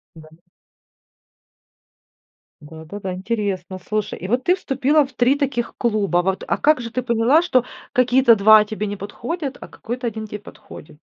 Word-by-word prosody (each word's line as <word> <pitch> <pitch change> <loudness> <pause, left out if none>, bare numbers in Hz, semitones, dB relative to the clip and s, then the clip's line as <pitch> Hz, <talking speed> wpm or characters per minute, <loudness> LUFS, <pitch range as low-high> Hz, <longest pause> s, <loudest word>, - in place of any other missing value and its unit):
Дали. 160 0 -15 2.2
Да-да-да, 160 +6 -8
интересно, 190 -2 -3
слушай, 210 +3 -3
и 185 - -7
вот 245 +4 0
ты 360 - +4
вступила 290 -3 +1
в 265 - -11
3 250 +2 +3
таких 265 -5 -2
клуба 205 -6 +1
вот, 190 +1 -2
а - - 0
как 305 -3 +3
же 230 - -6
ты 255 - -2
поняла, 240 +6 +3
что 255 -9 +2 0.3
какие-то 250 -1 +4
2 215 +1 +7
тебе 215 0 -4
не 205 - -4
подходят, 265 - -5
а - - -8
какой-то 245 +2 -6
1 220 -1 -4
те 210 - -6
подходит? 155 -6 -14
220 Hz, 155 wpm, -21 LUFS, 195-255 Hz, 2.2 s, 2